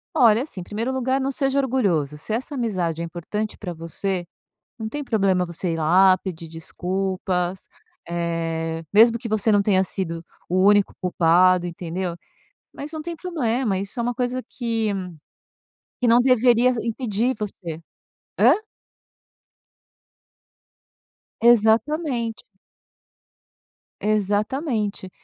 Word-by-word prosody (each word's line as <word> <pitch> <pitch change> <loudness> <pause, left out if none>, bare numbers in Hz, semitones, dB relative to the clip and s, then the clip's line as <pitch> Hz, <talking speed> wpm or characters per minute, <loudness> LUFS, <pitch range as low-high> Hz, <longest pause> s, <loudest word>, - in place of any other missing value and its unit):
Olha, 230 0 +5
assim, 205 - -7
primeiro 220 +7 -3
lugar, 260 +1 0
não 270 +1 -1
seja 270 +1 0
orgulhoso. 190 - 0
Se 215 - -4
essa 255 +6 -3
amizade 185 - -1
é - - -2
importante 210 +6 -4
para 180 -4 -6
você, 175 +2 -3 0.5
não 220 - -4
tem 290 +5 -4
problema 195 -7 +1
você 170 0 -3
ir - - -3
lá, 185 +4 +5
pedir 170 -3 -7
desculpas, 180 +2 -3 0.4
eh, 165 -1 -2
mesmo 230 +2 +6
que 230 - -6
você 215 0 +2
não 205 -1 +4
tenha 190 -2 +3
sido 170 -3 -4 0.2
o 185 +1 +3
único 205 -1 +4
culpado, 180 0 +3
entendeu. 175 +1 -4 0.6
Mas 295 +2 -7
não 315 -1 -6
tem 340 +1 -5
problema, 255 - -1
isso 200 +5 -5
é - - +2
uma 240 +1 -1
coisa 250 +1 -1
que 230 -3 -2 1.1
que 245 - +2
não 235 +1 +6
deveria 250 -1 +4 0.2
impedir 230 +1 -1
você. 175 -6 -5 0.6
Hã? - - +7 2.9
Exatamente. 235 +2 +2 1.6
Exatamente. 210 - -1
205 Hz, 120 wpm, -23 LUFS, 180-240 Hz, 2.9 s, Hã